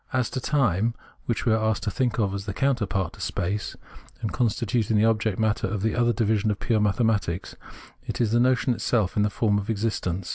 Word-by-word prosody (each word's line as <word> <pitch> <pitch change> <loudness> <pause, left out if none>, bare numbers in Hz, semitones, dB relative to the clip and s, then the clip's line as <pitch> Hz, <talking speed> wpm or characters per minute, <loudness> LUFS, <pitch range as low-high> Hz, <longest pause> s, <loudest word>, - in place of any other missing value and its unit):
As 130 -3 0
to 130 - -2
time, 115 - +1 0.3
which 120 - -1
we 115 - +4
are 110 0 +1
asked 110 -1 0
to 105 - -1
think 125 -1 0
of 100 -4 +1
as 100 +1 -5
the 100 - -4
coimterpart 105 -9 0
to - - -12
space, 100 +3 -2 0.4
and 110 - -3
as - - -6
constituting 115 -2 +1
the 105 - +4
object 110 -3 +1
matter 110 0 +1
of 100 0 -3
the 110 - +1
other 120 0 +2
division 110 -1 +1
of 105 - -1
pure 115 -3 +1
mathematics, 105 -4 0 0.5
it - - -4
is 115 -3 +1
the 120 - +3
notion 125 0 +3
itself 110 -4 0
in 105 - +2
the 105 - +2
form 105 0 +1
of 105 +2 -6
existence. 100 -5 -2
110 Hz, 220 wpm, -25 LUFS, 105-120 Hz, 0.5 s, we